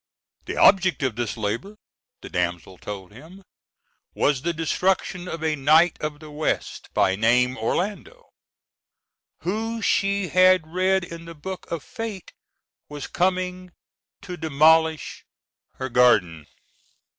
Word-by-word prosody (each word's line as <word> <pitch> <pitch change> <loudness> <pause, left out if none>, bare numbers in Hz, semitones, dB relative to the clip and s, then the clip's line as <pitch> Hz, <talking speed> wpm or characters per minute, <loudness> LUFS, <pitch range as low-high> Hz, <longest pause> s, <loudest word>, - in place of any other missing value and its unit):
The - - -5
object 185 -7 +4
of 130 -5 -1
this 120 -1 -3
labor, 115 - -3 0.5
the - - -9
damsel 90 0 -3
told 100 -3 -8
him, 160 - -14 0.7
was 140 -3 +1
the 170 - -1
destruction 180 +2 -1
of 165 -2 -6
a 155 -1 +1
knight 155 +5 +4
of 150 -1 -4
the 155 -1 -12
west, 150 +1 -3
by 95 - +3
name 125 +4 +2
Orlando, 205 - -3 1.1
who 225 +5 -2
she 200 -2 +1
had 185 -2 +5
read 185 +3 +1
in 170 -1 -9
the 165 0 -10
book 185 +5 -8
of 170 -3 -4
Fate 225 -6 -7 0.6
was 145 -2 -6
coming 180 0 -2 0.5
to 180 -2 -7
demolish 160 +1 +2 0.5
her 130 - -4
garden. 100 - +3
160 Hz, 125 wpm, -24 LUFS, 130-185 Hz, 1.1 s, had